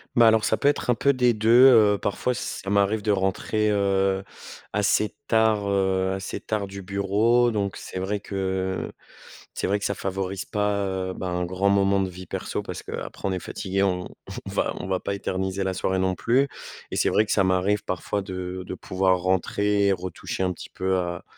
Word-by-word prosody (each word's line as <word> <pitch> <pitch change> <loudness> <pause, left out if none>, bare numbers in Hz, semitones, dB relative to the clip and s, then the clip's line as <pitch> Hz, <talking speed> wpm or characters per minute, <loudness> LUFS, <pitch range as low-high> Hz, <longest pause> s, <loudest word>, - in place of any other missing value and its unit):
Bah, 120 -1 +7
alors 110 -1 +4
ça 110 - +2
peut 140 - +1
être 145 - +1
un 125 - +5
peu 140 +3 +3
des 125 -2 +3
2, 110 +1 0 0.2
heu, 105 -4 +5
parfois, 115 +5 -1
ç - - -6 0.3
ça 95 - -3
m'arrive 100 +1 +2
de 105 - +2
rentrer, 100 +2 0
heu, 95 -1 +1 0.5
assez 105 +1 +1
tard, 110 -2 +3
heu 95 -1 +1
assez 95 0 -4
tard 105 -2 -2
du 100 0 -8
bureau. 105 +5 +2
Donc, 100 -2 -2
c'est 95 - -6
vrai 100 +2 -2
que 95 -1 -2 0.6
c'est - - -2
vrai 100 - +2
que - - -4
ça 100 - +1
favorise 95 -1 -3
pas, 105 -1 0
heu, 95 -1 -3
ben, 95 - -5
un 90 0 -1
grand 95 +3 0
moment 100 0 +3
de 95 - -1
vie 90 +1 -10
perso - - -4
parce - - -6
qu'après, - - -5
on 95 - 0
est 90 - -2
fatigué, 95 +2 -2
on 90 -2 -1 0.4
on - - -5
va, - - 0
on - - -5
va 95 -1 0
pas 100 - -3
éterniser 95 0 -2
la 95 -1 -2
soirée, 95 0 0
non 95 -1 +1
plus. 130 +8 +2 0.4
Et - - -3
c'est - - +2
vrai 110 - +3
que - - -3
ça 95 - +3
m'arrive 95 +3 +1
parfois, 95 +2 -2
de 95 -1 -5
de 90 - -5
pouvoir 95 0 +1
rentrer, 100 +2 +1
et 100 - +4
retoucher 90 0 -5
un 90 -1 0
petit - - -10
peu, 95 - -6
heu, - - +2
à 85 -1 -3
95 Hz, 215 wpm, -25 LUFS, 95-105 Hz, 0.6 s, Bah